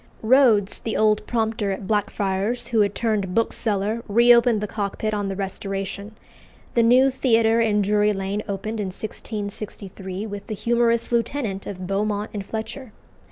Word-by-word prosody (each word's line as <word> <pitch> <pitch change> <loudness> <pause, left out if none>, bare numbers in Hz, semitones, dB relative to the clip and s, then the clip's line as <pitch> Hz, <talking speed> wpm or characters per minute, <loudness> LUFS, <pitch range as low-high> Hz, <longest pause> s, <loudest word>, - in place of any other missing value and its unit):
Rhodes, 225 -5 +4
the 225 - -3
old 215 -1 +3
prompter 220 -3 -1
at 195 +1 -5
Blackfriars, 205 +3 -1
who 225 -2 +3
had 200 -1 +1
turned 205 -5 -1
bookseller, 220 -1 0
reopened 235 +1 +5
the 210 - -3
Cockpit 210 +1 -3
on 205 -1 -1
the 195 - -3
Restoration. 195 +1 -5 0.6
The 235 - +4
new 255 +4 +5
Theatre 230 -3 +3
in 210 -2 +2
Drury 210 +1 +2
Lane 195 +1 -2
opened 215 +2 -4
in 205 - -2
1663 200 -1 -6
with 205 -2 -7
the 215 - -4
"Humorous 235 +2 +1
Lieutenant" 230 -4 -1
of 185 -2 -6
Beaumont 205 +2 -1
and 205 -2 -4
Fletcher. 220 +3 -6
210 Hz, 150 wpm, -23 LUFS, 200-230 Hz, 0.6 s, reopened